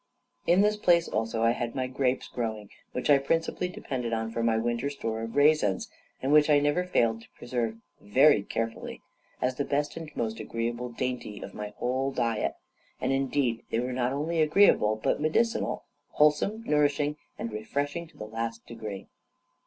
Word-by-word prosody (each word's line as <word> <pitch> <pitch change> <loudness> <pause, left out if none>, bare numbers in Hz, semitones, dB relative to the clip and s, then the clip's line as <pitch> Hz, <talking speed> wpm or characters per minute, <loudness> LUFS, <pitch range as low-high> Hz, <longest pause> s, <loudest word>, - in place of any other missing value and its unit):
In 180 +3 +5
this 210 +1 +3
place 175 -4 +4
also 115 +1 -1
I 115 - +5
had 120 -1 -3
my 130 -1 0
grapes 130 0 0
growing, 110 -4 -4 0.2
which 125 - -3
I 140 - +7
principally 165 +5 0
depended 125 -9 -4
on 110 0 -1
for 115 - -2
my 115 -1 +2
winter 120 +4 -1
store 115 -6 -3
of 115 +2 -6
raisins, 145 -9 +3 0.3
and 135 - +1
which 150 0 +6
I 150 - +6
never 145 +5 +2
failed 115 -10 +1
to - - -16
preserve 115 -2 -2 0.2
very 130 +3 +5
carefully, 115 +3 -4 0.4
as 125 0 0
the 140 - +1
best 145 +1 -1
and 165 -2 -6
most 115 -1 -2
agreeable 115 +2 -3
dainty 120 -4 -4
of 95 - -8
my 105 0 -6
whole 130 +2 0
diet; 115 -4 0 0.4
and - - 0
indeed 135 -3 0
they 115 - 0
were 125 +1 -2
not 125 0 0
only 160 +4 0
agreeable, 155 - +5
but 110 - -1
medicinal, 225 +10 +1 0.3
wholesome, 150 +9 +3
nourishing, 150 -3 +1 0.2
and 115 - -4
refreshing 145 +10 -3
to - - -22
the 105 - -6
last 115 +1 -4
degree. 110 -4 -7
125 Hz, 175 wpm, -28 LUFS, 115-145 Hz, 0.4 s, I